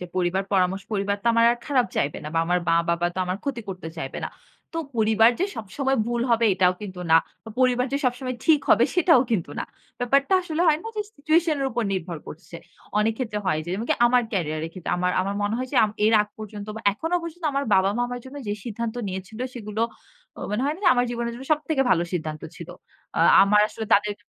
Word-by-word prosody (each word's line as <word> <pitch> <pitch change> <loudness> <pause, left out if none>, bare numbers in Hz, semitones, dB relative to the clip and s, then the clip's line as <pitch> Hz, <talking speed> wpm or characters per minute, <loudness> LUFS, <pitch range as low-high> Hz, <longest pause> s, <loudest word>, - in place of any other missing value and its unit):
যে 180 - -5
পরিবার 185 +1 +1
পরামর্শ 190 0 +2
পরিবার 200 0 0
তো - - -8
আমার 230 0 +4
আর 240 - -5
খারাপ 265 -5 +2
চাইবে 140 - 0
না। - - -4
বা - - +2
আমার 180 +1 +2
মা-বাবা 170 +1 +2
তো - - -5
আমার 180 +1 -2
ক্ষতি 275 -4 -2
করতে 180 -4 -6
চাইবে 135 -4 -5
না। - - -3 0.5
তো - - -1 0.2
পরিবার 220 +1 +5
যে - - +3
সবসময় 265 +6 -1
ভুল 240 0 -1
হবে 230 0 +3
এটাও 185 -1 +3
কিন্তু 185 -3 -7
না। 160 - +8 0.4
পরিবার 250 0 +3
যে 280 - +1
সবসময় 255 0 -1
ঠিক 310 -3 +5
হবে - - +6
সেটাও 335 -6 +5
কিন্তু 180 -10 0
না। - - -2 0.4
ব্যাপারটা 275 +7 +2
আসলে 330 -2 -3
হয় 305 -1 +4
না - - -6
যে 420 - 0
সিচুয়েশন 315 +2 +2
এর 270 - +1
উপর 240 -1 -1
নির্ভর 175 -3 -3
করছে। 170 +2 -10 0.4
অনেক 215 +1 +2
ক্ষেত্রে 220 -5 -2
হয় 155 -4 +1
যে - - -10
যেমনকি 215 +5 0
আমার 245 +1 +4
ক্যারিয়ার 155 -5 -1
এর - - -9
ক্ষেত্রে 185 - -5
আমার 180 0 +1
আমার 195 +2 -2
মনে 205 +2 0
হয় 255 0 -3
যে - - -1
আম 210 - -1 0.2
এর 220 - +4
আগ 210 - -10
পর্যন্ত 210 -1 -7
বা - - -5
এখনো 325 - -3
পর্যন্ত 335 +1 -8
আমার 275 0 0
বাবা-মা 195 +5 +2
আমার 245 0 -5
জন্য 265 +2 -10
যে - - 0
সিদ্ধান্ত 230 0 -4
নিয়েছিল, 190 +3 -7 0.2
সেগুলো 220 -2 -3 0.7
মনে 210 +4 -1
হয় 290 - +1
না - - -12
যে - - +7
আমার 245 0 +2
জীবনের 235 0 -2
জন্য 260 +3 -9
সব 300 - +2
থেকে 300 -4 +2
ভালো 170 -2 +4
সিদ্ধান্ত 155 -3 -3
ছিল। 170 - -9 0.5
আ - - +3 0.2
আমার 210 +1 +5
আসলে 220 0 -6
তাদের 205 +1 +1
220 Hz, 225 wpm, -24 LUFS, 185-255 Hz, 0.7 s, না